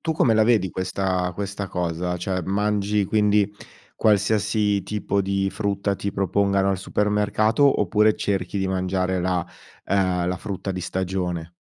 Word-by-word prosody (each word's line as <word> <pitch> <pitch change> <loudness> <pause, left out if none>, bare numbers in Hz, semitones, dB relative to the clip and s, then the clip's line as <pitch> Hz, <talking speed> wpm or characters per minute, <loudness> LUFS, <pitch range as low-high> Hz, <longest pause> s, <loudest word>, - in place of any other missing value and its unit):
tu 160 - -1
come 125 -7 +3
la 110 0 +4
vedi 110 -5 +2
questa 95 -1 -1
questa 100 0 -4
cosa? 90 0 -2
Cioè 90 +1 -2
mangi 105 +1 0
quindi 105 0 +2 0.4
qualsiasi 105 -1 +2
tipo 100 -1 -1
di 95 0 0
frutta 100 -1 -1
ti 100 +1 -3
propongano 100 0 +1
al 95 - -1
supermercato, 105 +7 +2
oppure 105 +2 +3
cerchi 95 -1 -2
di 95 -1 0
mangiare 95 0 -1
la 90 -1 -1 0.4
ehm, 95 -3 +1
la 90 - -1
frutta 95 -1 -4
di 90 - -4
stagione? 90 -2 -3
100 Hz, 145 wpm, -23 LUFS, 95-105 Hz, 0.4 s, la